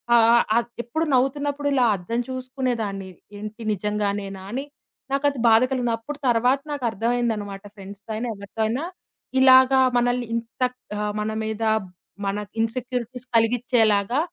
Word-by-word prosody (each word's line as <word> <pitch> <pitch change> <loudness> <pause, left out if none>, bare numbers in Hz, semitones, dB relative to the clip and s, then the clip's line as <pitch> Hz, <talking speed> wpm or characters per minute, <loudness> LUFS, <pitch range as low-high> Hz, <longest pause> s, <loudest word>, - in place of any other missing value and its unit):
ఆహ్, 230 -1 +6
ఆహ్, 235 - +5
ఆహ్, 235 0 +1 0.2
ఎప్పుడు 315 +8 -1
నవ్వుతున్నప్పుడు 285 +2 0
ఇలా 255 -3 +4
అద్దం 230 +7 -2
చూసుకునేదాన్ని 250 -7 -3 0.3
ఏంటి 215 +2 -7
నిజంగానేనా 200 -1 -2
అని? 265 +4 -3 0.5
నాకది 280 -1 +1
బాద 225 0 +6
కలిగింది. 245 -3 0
అప్పుడు 280 +6 -7
తర్వాత 245 +3 +3
నాకు 285 -3 -5
అర్థమైందనమాట. 220 -3 -1
ఫ్రెండ్స్‌తో 200 +1 -12
అయినా 240 +3 -3
ఎవరితో 200 +2 -7
అయినా, 245 +7 -2 0.6
ఇలాగా 260 0 +7 0.2
మనల్ని 245 0 +1
ఇంత 230 +3 -6 0.4
ఆహ్, 210 0 -1
మన 215 +1 -2
మీద 220 0 -3 0.6
మన 195 +1 -1 0.2
ఇన్సెక్యూరిటీస్ 250 +1 -3
కలిగిచ్చేలాగా, 225 -1 +2
235 Hz, 130 wpm, -24 LUFS, 210-255 Hz, 0.6 s, ఇలాగా